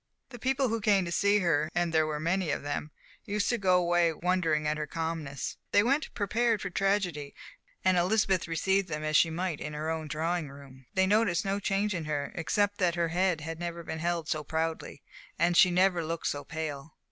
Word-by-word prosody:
The 245 -2 -10
people 265 +1 +1
who 225 0 -1
came 200 -3 +3
to 170 - -5
see 200 +3 +3
her, 155 -3 +1
and 175 -1 0
there 155 -1 +3
were 150 -1 -3
many 170 +2 0
of - - -2
them, 145 +1 -3 0.3
used 205 0 -1
to 240 - 0
go 185 -2 +4
away 175 -1 +3
wondering 165 -2 0
at 150 0 0
her 150 - -3
calmness. 160 -4 -4
They 205 - +5
went 275 +6 +1
prepared 225 +2 +1
for 195 - -4
tragedy, 180 -8 -1 0.5
and 185 -1 +4
Elizabeth 190 0 +2
received 190 +4 +1
them 150 -1 -3
as 155 0 -1
she 165 - +5
might 170 -1 -3
in 150 - -5
her 155 +2 -2
own 160 -1 -3
drawing 160 +1 -2
room. 135 -2 -14
They 190 0 +4
noticed 205 -3 +2
no 195 +1 0
change 205 +1 0
in 170 -4 -3
her, 145 -2 -2
except 205 +4 0
that 175 -3 +2
her 170 -1 0
head 180 -1 +1
had 165 +1 -6
never 170 -1 -5
been 160 - -5
held 170 -1 -1
so 155 -2 -1
proudly, 160 +2 -3 0.3
and 175 0 +2
she 180 - +7
had 175 - -2
never 180 -2 +3
looked 165 +1 -4
so 145 0 -1
pale. 155 -2 -6
170 Hz, 215 wpm, -29 LUFS, 155-195 Hz, 0.5 s, she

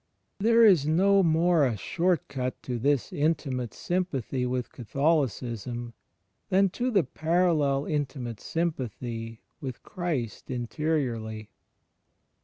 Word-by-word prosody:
There 230 +2 +6
is 175 -9 +5
no 195 +5 +4
more 165 -1 +3
a 120 -5 +1
short 175 - 0
cut 130 -1 -3
to 125 -2 -3
this 140 +1 +1
intimate 140 -6 0
sym 180 +1 -1
pathy 130 - -3
with 125 -1 -2
Catholicism 120 - -1 0.6
than 195 0 +4
to 245 +5 -1
the 200 -7 +3
parallel 155 -2 +1
intimate 135 -6 -3
sympathy 120 -8 -3 0.2
with 130 -6 -6
Christ 155 - -4
interiorly. 120 -5 -2
140 Hz, 110 wpm, -27 LUFS, 120-170 Hz, 0.6 s, There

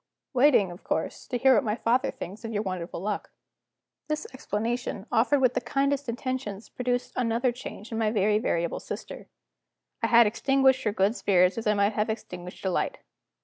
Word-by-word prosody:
"Waiting, 250 -8 +4
of 175 - -12
course, - - -3
to 250 - -1
hear 265 +2 +5
what 275 - +3
my 210 -3 0
father 245 +3 +1
thinks 195 +6 -8
of 225 - -4
your 210 -1 -1
wonderful 185 -4 -4
good - - -6
luck." 210 -1 -2 0.8
This 305 0 -2
explanation, 230 -3 -3
offered 265 +5 +3
with 255 -2 +4
the 255 - 0
kindest 275 +2 0
intentions, 235 -4 -4
produced 245 0 -2
another 240 +1 +1
change 240 -3 -9
in 225 - -2
my 220 -1 +2
very 210 0 +2
variable 170 -5 -1
sister. - - -7 0.7
I - - +2
had 235 0 +7
extinguished 265 +4 +2
her 210 - +2
good 205 +2 +1
spirits 185 -4 +3
as 225 - -4
I 210 - +3
might 200 +1 +2
have 210 +1 0
extinguished 180 -4 -6
a 190 - +1
light. - - -1
225 Hz, 190 wpm, -27 LUFS, 205-255 Hz, 0.8 s, had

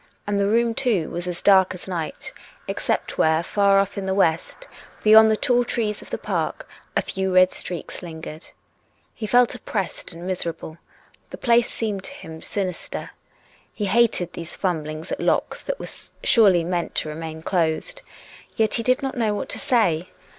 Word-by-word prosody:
And 205 -1 0
the 200 - +2
room, 230 +2 +2
too, 225 -10 0
was 175 +1 -4
as 175 -1 -5
dark 190 -2 +5
as 180 - -10
night, 170 -4 -5 0.3
except - - -2
wrhere 160 +1 +3
far 200 0 +3
off 200 0 +1
in 190 - -4
the 190 - 0
west, 180 - 0 0.4
beyond 220 +1 +8
the 215 - +2
tall 245 +1 +2
trees 220 -3 -2
of - - -12
the - - -3
park, - - -3 0.3
a - - +2
few 190 0 -2
red 185 0 +6
streaks 175 -3 -5
lingered. 160 -2 -8 0.7
He 215 - -5
felt 245 +2 +4
oppressed 195 -4 -4
and 170 +1 -9
miserable. 170 -3 -4 0.5
The - - -8
place 235 0 +3
seemed 210 -4 -3
to 275 - -6
him 160 - -10
sinister. 185 -4 -4 0.6
He 210 - -3
hated 200 -4 +2
these 170 0 -7
fumblings 155 -4 -3
at - - -2
locks - - 0
that - - -3
were - - -5 0.4
surely 195 -7 +5
meant 175 0 -2
to 155 - 0
remain 160 +1 -6
closed. 180 - -1 0.5
Yet 220 -1 +1
he 235 - +2
did 255 +4 +1
not 270 - -2
know 220 -4 +1
what - - -4
to - - -2
say. 185 -8 +1
190 Hz, 175 wpm, -23 LUFS, 170-225 Hz, 0.7 s, beyond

